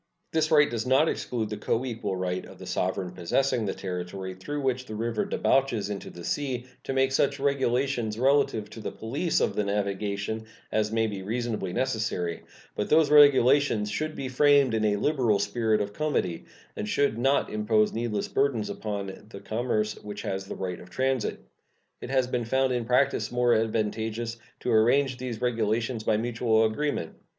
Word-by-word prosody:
This 160 -1 +1
right 150 -2 +6
does 115 0 -3
not 135 +5 +4
exclude 110 -8 -2
the 105 - -3
coequal 115 -2 -2
right 90 0 -2
of - - -13
the - - -10
sovereign 95 0 -2
possessing 110 +7 0
the - - -1
territory 95 0 -5
through 145 +11 -5
which 130 -1 -1
the 110 - -6
river 115 0 -1
debouches 120 -7 +1
into 100 - -5
the 85 - -10
sea 130 +2 -2 0.2
to - - -2
make 135 0 +2
such 140 +1 +1
regulations 130 -4 0
relative 130 -4 +2
to - - -9
the - - -4
police 145 +9 -1
of - - 0
the 105 - +1
navigation 100 +2 -2 0.2
as 110 0 +1
may 110 0 +2
be 100 -3 -4
reasonably 110 -2 -2
necessary; 105 -8 -1 0.3
but 105 - -2
those 155 -1 +4
regulations 140 -6 +5
should 155 +7 -2
be 135 - -4
framed 140 -1 +4
in 110 -1 +1
a 105 -1 +3
liberal 120 -2 +2
spirit 110 0 +1
of 100 0 -3
comity, 130 - -1 0.3
and 105 - -4
should 140 -4 +1
not 135 +3 +2
impose 105 0 +2
needless 110 -3 -2
burdens 135 -6 0
upon 100 -1 -5
the 100 - -9
commerce 110 0 -1
which 105 -1 -6
has 95 0 -3
the - - -5
right 90 -2 -4
of 90 - -13
transit. 130 +3 -1 0.6
It - - -6
has 130 -1 +2
been 125 -1 -2
found 130 +2 +1
in 120 -2 -1
practice 130 +3 +2
more 120 -1 +3
advantageous 110 +1 -1 0.2
to 125 - -1
arrange 125 +4 +3
these 125 -3 -5
regulations 115 -1 0
by 110 -1 +2
mutual 115 -1 +2
agreement. 110 - -2
115 Hz, 175 wpm, -27 LUFS, 105-130 Hz, 0.6 s, right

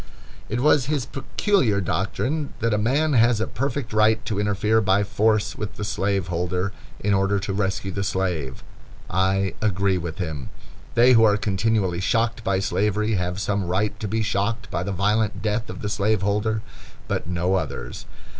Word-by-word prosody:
It 120 +3 -1
was 145 -2 +4
his 145 -4 0
peculiar 135 - +1
doctrine 125 - -2
that 115 -2 +1
a 105 - +2
man 140 +8 +2
has 120 -2 +4
a 110 - +1
perfect 135 -3 -3
right 110 +1 +3
to 105 -2 -2
interfere 105 +2 +2
by 100 0 +3
force 105 0 +1
with 105 -1 -5
the - - -5
slaveholder, 95 -2 -1 0.3
in 105 0 +1
order 95 +1 +2
to 95 0 -3
rescue 95 -1 -1
the 100 +1 -2
slave. 90 -9 -2 0.5
I 95 0 +1
agree 100 -3 +1
with 85 -1 -5
him. 80 -7 -4 0.5
They 120 +2 +6
who 115 -2 +6
are 105 -2 +5
continually 105 -3 0
shocked 115 +2 0
by 95 -2 +1
slavery 105 +3 0
have 90 -1 -1
some 100 -1 -1
right 100 +3 -1
to 105 - -3
be 110 +2 0
shocked 110 +2 -1
by 85 - -1
the 100 +3 -3
violent 105 +3 0
death 110 +1 -1
of - - -7
the - - -1
slaveholder, 105 +1 0 0.4
but - - -2
no 90 +1 0
others. 75 -9 -3
105 Hz, 170 wpm, -23 LUFS, 95-110 Hz, 0.5 s, They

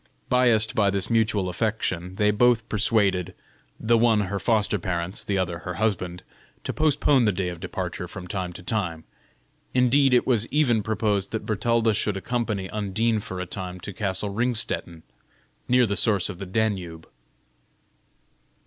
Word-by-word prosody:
Biassed 120 -4 +4
by 100 -2 +3
this 100 +2 0
mutual 110 -4 +2
affection, 90 -2 -2
they 105 +1 +3
both 115 +1 +3
persuaded 100 -4 +1 0.4
the 115 +1 +3
one 115 -2 +4
her 100 0 -2
foster 105 -1 +1
parents, 85 +2 -3
the 100 - -1
other 90 -3 -2
her 90 +3 -6
husband 90 -3 -2 0.4
to - - -3
postpone 145 -4 +3
the 105 - +3
day 90 -1 -2
of 85 -2 -7
departure 90 -1 -5
from 90 0 -9
time 90 -1 -3
to 90 - -10
time; 90 -5 -2 0.7
indeed, 130 +1 +4
it 120 - +3
was 115 -3 +1
even 130 -7 +2
proposed 105 -2 -1
that 110 - -4
Bertalda 115 +1 +1
should 105 -1 -1
accompany 110 -3 -2
Undine 110 +2 0
for 95 -2 -6
a 90 - -3
time 90 0 -6
to 100 - -7
castle 100 0 -2
Ringstetten, 110 -7 -1 0.6
near 125 0 +4
the 100 -2 -1
source 100 -3 +1
of 95 -4 -7
the 100 - -6
Danube. 95 -6 -2
105 Hz, 155 wpm, -25 LUFS, 90-115 Hz, 0.7 s, Biassed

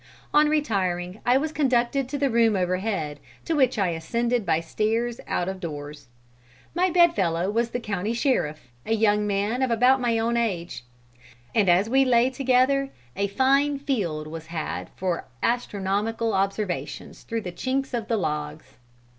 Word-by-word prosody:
On 300 0 +5
retiring 195 -10 -1
I 250 +2 +5
was 305 +3 -1
conducted 260 -2 +1
to 285 - -3
the 275 -2 +1
room 230 -2 +3
overhead, 185 -5 -1 0.3
to 330 - 0
which 260 -4 +3
I 195 -3 +2
ascended 235 +7 -1
by 160 -1 +3
stairs 225 +7 -1
out 175 - -1
of 190 0 -4
doors. 150 -5 -7 0.7
My 360 +3 +2
bed 345 -1 +5
fellow 175 +1 0
was 230 +2 0
the 245 - -3
county 210 -1 -2
sheriff, 155 - -1
a 225 - 0
young 210 -1 +2
man 205 +5 0
of 260 - +2
about 250 +3 +4
my 235 -2 +1
own 230 +1 0
age. 175 - -2 0.7
And 205 -5 +3
as 180 +4 +4
we 265 +3 +4
lay 250 0 +3
together 265 +1 +2 0.3
a 200 +1 0
fine 275 +6 +2
field 200 - -2
was 160 +1 -8
had 160 -2 -4
for 180 -2 -2 0.2
astronomical 225 -1 -1
observations 195 0 -2
through 230 -1 -4
the 180 - -6
chinks 265 +8 -2
of 230 -3 -2
the 230 - +1
logs. 150 -4 -4
225 Hz, 165 wpm, -25 LUFS, 180-255 Hz, 0.7 s, On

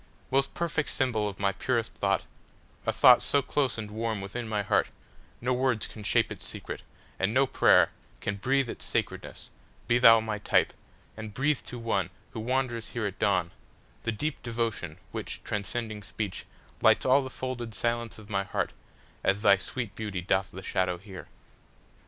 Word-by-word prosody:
Most 135 +1 +2
perfect 160 -3 0
symbol 110 -6 +1
of 100 - -10
my 100 0 +2
purest 115 +2 -1
thought,—A - - -3
thought - - +7
so 140 -1 +2
close 140 -3 0
and 105 -2 -5
warm 110 0 -2
within 105 +5 -5
my 105 -2 0
heartNo 125 +4 -2
words 125 -3 +1
can 110 - -10
shape 105 - +2
its - - -6
secret, - - -6 0.4
and 95 +2 +2
no 135 +1 +6
prayerCan 105 -5 +2
breathe 135 +2 +2
its - - -6
sacredness—be 120 +1 -3
thou 115 -2 +9
my 110 -1 -3
type, - - +2 0.4
And 110 -1 -7
breathe 145 +1 +2
to 125 - -5
one, 110 -5 0 0.2
who - - -6
wanders 120 0 -1
here 120 -3 -2
at 100 -2 -4
dawn, 90 -4 +2 0.5
The 115 - -1
deep 145 +8 -3
devotion, 115 -9 -2
which, - - -5
transcending 105 +1 -3
speech, 100 0 -5 0.4
Lights - - +5
all 130 +2 +6
the 130 - -5
folded 120 -4 -5
silence 115 +2 -1
of 110 -2 -12
my 100 -2 0
heartAs 95 0 -3
thy 100 -1 +6
sweet 115 +2 -4
beauty 105 -4 -4
doth 95 +1 +1
the 95 +1 -9
shadow 90 -1 0
here. 95 0 -10
110 Hz, 160 wpm, -29 LUFS, 100-125 Hz, 0.5 s, thou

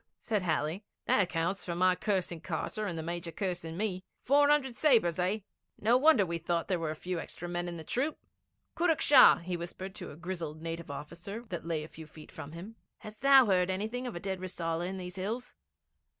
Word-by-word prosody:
said 215 -3 -1
Halley. 170 +2 -1 0.2
'That - - +4
accounts 175 +1 -1
for 170 - -3
my 185 +1 +4
cursing 180 -3 -1
Carter 180 +6 -3
and 170 -3 -3
the 160 - -3
Major 170 0 -4
cursing 175 -2 -3
me. 190 -3 -2 0.2
Four 285 +2 +5
hundred 285 -4 +3
sabres, 230 - +3
eh? 190 +4 +1 0.4
No 230 +4 +4
wonder 260 -6 +5
we 170 -1 -3
thought 170 0 -1
there 185 -3 0
were 165 -2 -2
a 155 - -3
few 180 +2 -4
extra 175 - -7
men 175 0 -2
in 170 -1 -4
the 160 - -7
troop. 275 - -1 0.6
Kurruk 335 -2 +2
Shah,' 280 -3 +8
he 180 0 -2
whispered 175 +3 -6
to - - -7
a - - -10
grizzled 170 -3 -5
native 165 0 -5
officer 170 +10 -7
that 170 -2 -5
lay 165 -2 -1
within - - -6
a - - -16
few 160 -1 -10
feet 155 0 -14
of 150 - -8
him, 195 +7 -9 0.2
'hast 215 0 -11
thou 275 -1 +8
heard 185 -3 +2
anything 220 +7 -2
of 240 - -6
a - - -3
dead 190 0 -3
Rissala 170 -2 -3
in 190 +1 -4
these 180 0 -7
hills?' 220 +7 -4
180 Hz, 215 wpm, -31 LUFS, 170-215 Hz, 0.6 s, Shah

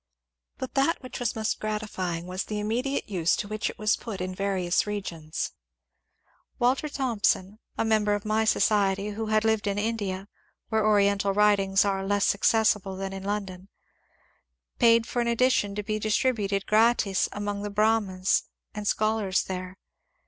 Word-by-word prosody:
But 260 - -6
that 280 +2 +1
which 255 - -7
was 245 -1 -1
most 220 -1 -1
gratifying 200 -6 -3
was 185 +1 -4
the 210 - -4
immediate 245 +6 -1
use 180 -5 +1
to - - -4
which 215 +1 -2
it - - -9
was 215 0 +2
pot 215 -5 -7
in 185 0 -3
various 190 -1 0
regions. 170 -6 -4 1.1
Walter 260 +5 +1
Thomson, 220 -7 0 0.2
a - - +1
member 215 -2 +2
of 205 - -6
my 215 +1 +1
society 200 -2 +2
who 220 +1 -4
had 215 0 +2
lived 220 -1 +1
in 200 0 -1
India 205 -3 -2 0.4
(where 220 -1 +1
Oriental 200 -2 +3
writings 200 -2 +3
are 195 -1 0
less 200 0 +2
acces 220 +2 +4
sible 195 -2 -8
than 195 0 -4
in 195 - -6
London), 195 -2 -4 1.1
paid 230 -1 +5
for 240 - -2
an 235 - -1
edition 235 -4 +2
to 210 - -3
be 215 +1 -2
distributed 215 -3 0
gratis 215 -3 +3
among 205 0 -3
the 205 - -3
Brahmos 205 -3 +1 0.3
and 210 -1 -5
scholars 215 -3 +1
there. 185 0 -6
210 Hz, 160 wpm, -27 LUFS, 195-220 Hz, 1.1 s, paid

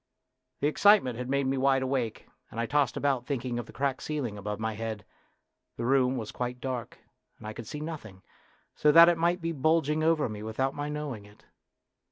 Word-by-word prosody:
The 145 - +3
excitement 155 - +4
had 125 0 -4
made 140 0 +1
me 135 0 0
wide 135 0 +3
awake, 130 -4 -2 0.2
and 115 - -7
I 115 - +1
tossed 140 -1 +1
about 135 -4 0
thinking 125 -3 -2
of 120 - -6
the - - -11
cracked 135 +1 -1
ceiling 140 -8 -3
above 105 +1 -5
my 110 0 -2
head. 110 -1 -5 0.7
The 115 - -3
room 130 0 +3
was 110 -3 -5
quite 125 0 -4
dark, 125 -3 -5 0.4
and - - -13
I 110 - -5
could 115 0 -9
see 150 - -6
nothing, 125 - -7 0.5
so 150 - +4
that 165 +2 +9
it 170 - +2
might 175 +2 +1
be 165 0 -1
bulging 155 0 +1
over 160 -1 +3
me 105 -2 -7
without 120 +5 -1
my 145 0 -4
knowing 145 -8 -5
it. 105 0 -19
130 Hz, 205 wpm, -29 LUFS, 115-150 Hz, 0.7 s, that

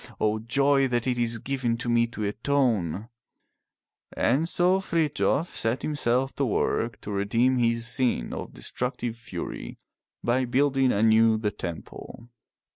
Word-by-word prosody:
O 110 0 +1
joy 135 +4 +2
that 120 -2 -1
it 125 -2 0
is 115 -1 +1
given 125 -1 -2
me 120 0 +2
to 110 -2 -6
atone!" 110 - 0 1.1
And 150 +7 +2
so 180 +2 +3
Frithjof 165 -2 0
set 115 +3 -1
himself 135 -3 +1
to 140 - +1
work 115 -1 -1
to 105 - -6
redeem 115 +6 +1
his 115 -1 +1
sin 115 - +1
of - - -6
de - - -12
structive 125 - -3
fury 90 - -7 0.5
by 125 +2 +1
building 135 +1 +2
anew 110 +1 +4
the 105 -1 -1
temple. 100 +5 -8
120 Hz, 135 wpm, -26 LUFS, 110-135 Hz, 1.1 s, anew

